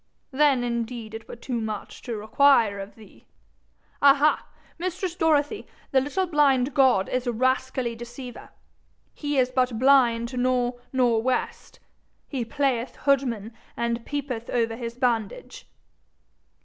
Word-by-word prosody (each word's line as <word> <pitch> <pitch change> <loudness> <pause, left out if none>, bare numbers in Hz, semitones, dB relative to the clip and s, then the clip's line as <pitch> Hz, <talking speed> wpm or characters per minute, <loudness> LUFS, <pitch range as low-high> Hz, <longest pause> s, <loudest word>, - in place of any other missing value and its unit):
Then 275 -2 +3
indeed 235 -2 -4
it 225 0 -8
were - - -8
too 240 0 -4
much 215 -2 -6
to 235 -4 -5
require 220 -1 +3
of 195 +1 -8
thee! 220 -2 -18 0.7
Ah 280 -1 +7
ha! 295 +2 +2 0.3
mistress 365 0 -3
Dorothy, 315 +3 +1 0.2
the 265 - +4
little 290 +8 -1
blind 285 -5 +2
god 260 -9 +4
is 255 0 -2
a - - +2
rascally 255 0 0
deceiver. 240 +1 -9 0.6
He 290 -1 -3
is 255 -1 +2
but 255 -2 +1
blind 245 -2 +3
nor' 250 -1 0
nor' 245 -4 +2
west. 255 +1 -3 0.5
He 265 -4 -3
playeth 255 0 -1
hoodman, 245 -6 0 0.2
and 235 0 -1
peepeth 260 -5 -4
over 230 -2 0
his 230 0 -6
bandage.' 250 - -2
250 Hz, 135 wpm, -25 LUFS, 235-275 Hz, 0.7 s, Ah